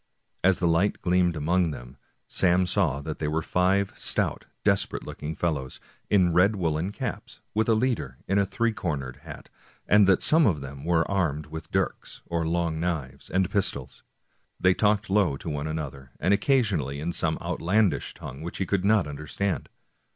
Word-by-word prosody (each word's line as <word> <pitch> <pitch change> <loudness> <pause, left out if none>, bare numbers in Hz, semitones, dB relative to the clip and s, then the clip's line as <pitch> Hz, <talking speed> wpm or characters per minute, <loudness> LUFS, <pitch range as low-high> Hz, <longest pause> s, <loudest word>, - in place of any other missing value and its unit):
As 95 0 +4
the 85 - +1
light 85 +5 +2
gleamed 90 -1 +2
among 85 +3 +1
them, 65 -3 -8 0.3
Sam 90 0 +3
saw 90 -7 +1
that 75 +1 -6
they 75 - -1
were 80 +1 -1
five 95 +3 +1
stout, - - 0 0.2
desperate - - +1
looking 80 +2 -6
fellows, 75 -6 -2 0.3
in 90 -4 +4
red 95 +5 +4
woolen 85 0 -1
caps, - - -6
with 110 +1 +1
a 115 - +5
leader 125 +1 -1
in 100 +1 +2
a 100 - +3
three 115 +2 0
cornered 70 -10 -3
hat, 75 -1 -11 0.4
and 105 -1 +6
that 95 - +4
some 160 -1 +5
of 85 -8 +1
them 70 0 -8
were 85 -1 +2
armed 80 -7 0
with 80 +1 -8
dirks, - - -2
or 85 -1 -1
long 85 -1 0
knives, 75 -6 -3
and 95 -1 +1
pistols. 70 -10 -1 0.6
They 90 0 +4
talked 105 +1 +2
low 95 -8 +2
to 80 - -6
one 75 +1 -3
another, 70 -4 -5
and 90 +6 +2
occasionally 100 - +1
in 85 +3 -3
some 80 -1 0
outlandish 100 +2 0
tongue 65 +3 -9
which 85 +2 -6
he 95 - -1
could 95 +1 0
not 105 -2 +4
understand. 75 +6 -3
85 Hz, 175 wpm, -26 LUFS, 75-100 Hz, 0.6 s, and